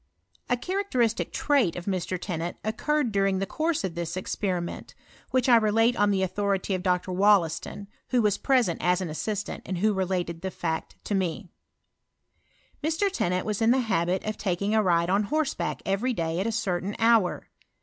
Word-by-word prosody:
A 245 Hz, -, +2 dB
cfaaractei'istic 255 Hz, -, 0 dB
trait 275 Hz, -, +2 dB
of 180 Hz, -, -6 dB
Mr. 185 Hz, -2 st, -2 dB
Tennant 170 Hz, -2 st, -4 dB
occurred 250 Hz, +4 st, 0 dB
dunng 195 Hz, -1 st, +2 dB
the 195 Hz, -, -1 dB
course 315 Hz, -, -1 dB
of 190 Hz, -3 st, -2 dB
this 170 Hz, 0 st, -4 dB
esperiment, 185 Hz, -2 st, -3 dB, 0.3 s
which 255 Hz, -1 st, +1 dB
I 240 Hz, -2 st, +7 dB
relate 225 Hz, +2 st, +3 dB
on 205 Hz, -2 st, +3 dB
the 195 Hz, -1 st, +1 dB
authority 195 Hz, +1 st, -1 dB
of 185 Hz, -, -1 dB
Dr. 180 Hz, 0 st, 0 dB
Wollaston, 195 Hz, 0 st, +2 dB, 0.2 s
who 250 Hz, -, +2 dB
was 205 Hz, -2 st, +2 dB
present 245 Hz, -, +2 dB
ta 180 Hz, 0 st, +3 dB
U 185 Hz, -3 st, -3 dB
assistant, 210 Hz, +6 st, -3 dB
and 185 Hz, -, -4 dB
who 210 Hz, +4 st, +2 dB
related 180 Hz, -3 st, -2 dB
the 190 Hz, -, -2 dB
fact 160 Hz, -3 st, -4 dB
tome, 190 Hz, -2 st, -2 dB, 1.3 s
Mr. 325 Hz, +6 st, +1 dB
Teti 275 Hz, -, 0 dB
nant 180 Hz, 0 st, -1 dB
was 210 Hz, 0 st, -2 dB
in 225 Hz, -, +4 dB
the 250 Hz, -, +5 dB
habit 185 Hz, -5 st, 0 dB
of 215 Hz, 0 st, -4 dB
taking 200 Hz, +1 st, -1 dB
a 220 Hz, -, +4 dB
ride 170 Hz, -2 st, +2 dB
on 200 Hz, +2 st, +2 dB
horsebaok 305 Hz, +5 st, -1 dB
every 210 Hz, +7 st, 0 dB
day 165 Hz, -3 st, -2 dB
at 195 Hz, -, 0 dB
a -, -, 0 dB
certain 200 Hz, -3 st, -2 dB
hour. 225 Hz, -5 st, +2 dB
200 Hz, 180 wpm, -26 LUFS, 180-230 Hz, 1.3 s, I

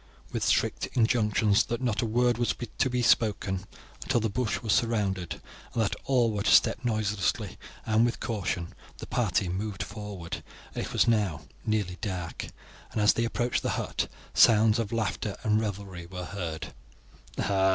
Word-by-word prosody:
With -, -, -2 dB
strict -, -, +1 dB
injunctions 105 Hz, -3 st, +3 dB
that 120 Hz, -, -2 dB
not 120 Hz, -3 st, 0 dB
a 115 Hz, -, 0 dB
word 120 Hz, +1 st, +2 dB
was 120 Hz, -, +1 dB, 0.2 s
to 130 Hz, -, +3 dB
be 125 Hz, -1 st, 0 dB
spoken 100 Hz, -4 st, +2 dB, 0.4 s
until 130 Hz, -2 st, +1 dB
the 110 Hz, -2 st, -1 dB
bush 115 Hz, +1 st, -1 dB
was 110 Hz, -1 st, +2 dB
surrounded, 100 Hz, -7 st, 0 dB, 0.4 s
and 115 Hz, -, +3 dB
that 105 Hz, -, 0 dB
all 125 Hz, -4 st, +3 dB
were 105 Hz, -1 st, -2 dB
to 100 Hz, -, +1 dB
step -, -, +5 dB
noiselessly 105 Hz, -5 st, -1 dB, 0.3 s
and 110 Hz, +1 st, +3 dB
with 120 Hz, 0 st, 0 dB
caution, 90 Hz, -6 st, -2 dB, 0.2 s
the -, -, -7 dB
party 95 Hz, -, +1 dB
moved 100 Hz, +2 st, -3 dB
forward. 100 Hz, -5 st, -6 dB, 0.3 s
It -, -, -4 dB
was -, -, +3 dB
now 105 Hz, -9 st, +2 dB, 0.3 s
nearly 105 Hz, -5 st, 0 dB
dark, 90 Hz, -5 st, -4 dB, 0.4 s
and -, -, -2 dB
as 105 Hz, 0 st, +5 dB
they 115 Hz, -, 0 dB
approached 120 Hz, +1 st, 0 dB
the -, -, -1 dB
hut -, -, -1 dB, 0.3 s
sounds 110 Hz, 0 st, +6 dB
of 110 Hz, -3 st, -2 dB
laughter 110 Hz, -2 st, -2 dB
and 110 Hz, 0 st, +3 dB
revelry 100 Hz, -5 st, -5 dB
were 90 Hz, 0 st, -6 dB
heard. 85 Hz, -7 st, -5 dB
105 Hz, 160 wpm, -28 LUFS, 95-115 Hz, 0.4 s, sounds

